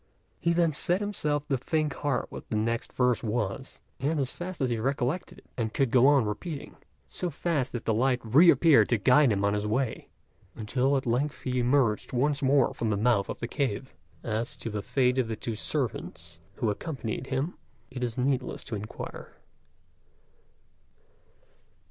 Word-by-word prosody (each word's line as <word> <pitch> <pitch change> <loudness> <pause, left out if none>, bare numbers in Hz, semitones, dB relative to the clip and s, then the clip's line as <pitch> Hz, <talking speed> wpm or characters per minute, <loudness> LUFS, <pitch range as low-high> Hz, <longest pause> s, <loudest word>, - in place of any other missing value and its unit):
He 170 - +1
then 170 -1 +3
set 175 +5 +1
himself 150 -8 -1
to 135 -3 +1
think 155 +2 0
hard 145 -4 -1
what - - -9
the - - -2
next 115 +2 -1
verse 125 -2 +2
was, 110 +2 -3 0.2
and 145 +4 0
as 130 -2 0
fast 180 0 -6
as 130 -3 0
he 115 - 0
recollected 135 +6 -2
and 110 -2 -3
could 135 -5 +2
go 125 +1 +6
on 140 -5 +5
repeating, 140 - -5 0.3
so 180 - -1
fast 155 -3 -1
did 120 - -4
the 110 - +2
light 125 +3 +2
reappear 145 +1 +6
to 120 - +1
guide 125 +5 +5
him 100 -1 +1
on 100 - +2
his 105 0 -1
way, 125 +3 -1 0.5
until 130 +5 +1
at 130 - -3
length 130 +5 -1
he 125 -1 -1
emerged 125 -3 +2
once 140 +3 +1
more 135 -1 +3
from 115 - -2
the 105 - +1
mouth 105 -2 +2
of - - -4
the 120 - -2
cave. 130 -2 -2 0.3
As 115 0 -2
to 115 - -5
the 105 -1 -3
fate 125 +3 +1
of 125 - +1
the 110 - -3
two 115 - -4
servants 85 -5 -4 0.2
who 110 - 0
accompanied 130 -1 -4
him 135 +6 -1 0.4
it 125 -1 -5
is 120 -2 -3
needless 130 0 -1
to 110 - -5
inquire. 105 +1 -7
125 Hz, 175 wpm, -28 LUFS, 115-145 Hz, 0.5 s, go